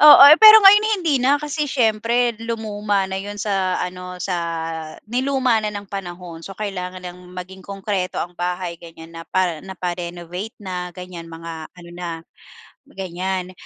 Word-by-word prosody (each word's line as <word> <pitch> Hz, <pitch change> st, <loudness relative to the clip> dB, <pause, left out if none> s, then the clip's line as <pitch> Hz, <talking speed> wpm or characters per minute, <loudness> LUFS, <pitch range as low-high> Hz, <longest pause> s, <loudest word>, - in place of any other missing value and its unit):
Oo 300 Hz, -2 st, +10 dB
eh, 305 Hz, -, +9 dB
pero 435 Hz, -1 st, +10 dB
ngayon 415 Hz, +2 st, +9 dB, 0.2 s
hindi 300 Hz, -7 st, +1 dB
na, 275 Hz, +3 st, +4 dB
kasi 300 Hz, 0 st, -2 dB
siyempre 235 Hz, 0 st, +2 dB
lumuma 210 Hz, -3 st, -1 dB
na 190 Hz, 0 st, -4 dB
yun 205 Hz, +1 st, -7 dB
sa 195 Hz, -3 st, 0 dB
ano 180 Hz, 0 st, -7 dB
sa 180 Hz, -2 st, -2 dB, 0.7 s
niluma 255 Hz, -1 st, +1 dB
na 210 Hz, -, -2 dB
ng 205 Hz, 0 st, -6 dB
panahon. 175 Hz, -3 st, -7 dB
So, 195 Hz, -, -8 dB
kailangan 185 Hz, -3 st, -5 dB
nang 180 Hz, 0 st, -8 dB
maging 185 Hz, +1 st, -8 dB
konkreto 195 Hz, -2 st, -3 dB
ang 175 Hz, -, -4 dB
bahay 180 Hz, -1 st, -3 dB
ganyan, 165 Hz, 0 st, -12 dB
napa 165 Hz, 0 st, -1 dB
napa-renovate 180 Hz, +1 st, -6 dB
na 180 Hz, -2 st, -5 dB
ganyan, 180 Hz, -2 st, -9 dB
mga 165 Hz, -1 st, -8 dB
ano 175 Hz, -1 st, -14 dB
na, 175 Hz, 0 st, -6 dB, 0.8 s
ganyan. 185 Hz, 0 st, -4 dB
190 Hz, 150 wpm, -21 LUFS, 180-220 Hz, 0.8 s, Oo